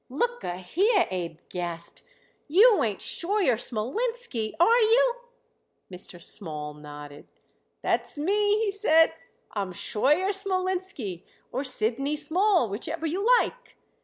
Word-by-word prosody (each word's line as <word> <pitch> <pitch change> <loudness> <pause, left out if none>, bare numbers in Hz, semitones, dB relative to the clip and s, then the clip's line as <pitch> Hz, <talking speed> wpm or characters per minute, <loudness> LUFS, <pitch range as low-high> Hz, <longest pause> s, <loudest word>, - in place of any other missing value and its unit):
"Look 480 - -1
a 175 - -3
here!" 365 - +2
Abe 170 -3 -4
gasped. 170 -2 -5 0.5
"You 410 +8 +6
ain't 210 -4 -2
Scheuer 365 - +1
Smolinski, 255 - -3
are 460 +8 +5
you?" 480 +2 +4 0.8
Mr. 180 -1 -4
Small 150 -4 -4
nodded. 145 -1 -11 0.6
"That's - - -1
me," 410 +6 +2
he 405 - 0
said. 325 -5 +4 0.4
"I'm 200 -3 -3
Scheuer 300 - +1
Smolinski 370 - -2 0.3
or 260 +3 -2
Sidney 255 +3 -1
Small, 345 - +2
whichever 310 +11 -4
you 350 +5 -1 0.2
like. - - -5
300 Hz, 115 wpm, -26 LUFS, -, 0.8 s, You